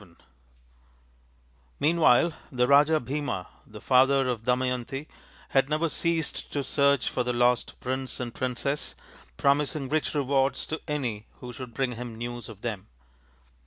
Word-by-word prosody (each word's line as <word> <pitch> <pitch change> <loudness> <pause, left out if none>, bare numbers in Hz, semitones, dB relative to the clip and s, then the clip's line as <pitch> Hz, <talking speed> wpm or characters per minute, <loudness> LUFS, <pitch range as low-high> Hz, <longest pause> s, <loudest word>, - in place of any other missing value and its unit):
VII 85 -4 -18 1.6
Meanwhile 160 0 +4 0.2
the 125 -2 +2
Raja 145 +3 +5
Bhima, 135 -7 -3 0.2
the 105 0 -11
father 135 +3 +4
of 120 -3 -2
Dama 125 +2 +1
yanti, 125 +3 -3 0.4
had 135 0 +2
never 155 +2 +1
ceased 165 0 -1
to 145 - -1
search 140 -1 +2
for 125 - 0
the 125 0 -1
lost 120 0 +1
prince 130 +1 -3
and 120 -2 -4
princess, 130 +3 -2 0.4
promising 140 -1 +1
rich 155 0 0
rewards 135 -1 +1
to 160 - -4
any 125 -8 -3
who 125 -1 -9
should 125 -1 -9
bring 135 -2 0
him 120 -1 -7
news 120 0 -5
of 105 -2 -11
them. 105 -5 -4
130 Hz, 145 wpm, -27 LUFS, 120-145 Hz, 1.6 s, Raja